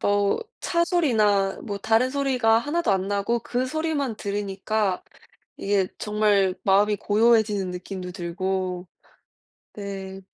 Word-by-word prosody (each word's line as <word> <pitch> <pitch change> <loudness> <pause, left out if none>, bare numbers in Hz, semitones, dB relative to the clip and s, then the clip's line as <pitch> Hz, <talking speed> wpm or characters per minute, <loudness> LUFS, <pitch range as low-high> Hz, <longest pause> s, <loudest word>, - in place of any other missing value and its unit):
뭐 205 0 +2 0.2
차 340 -1 +1
소리나 215 - +2
뭐 205 - -4
다른 225 +5 +2
소리가 255 -5 +2
1 295 +8 -1
도 205 - +2
안 190 0 -1
나고 205 +4 0
그 250 +2 -2
소리만 290 -4 -2
들으니까 200 -1 -2 0.5
이게 195 -2 +1
정말 210 -3 +2
마음이 205 +2 +4
고요해지는 210 -2 +2
느낌도 180 0 -6
들고 185 0 -3 0.9
네. 195 -1 -6
205 Hz, 240 characters per minute, -24 LUFS, 195-235 Hz, 0.9 s, 마음이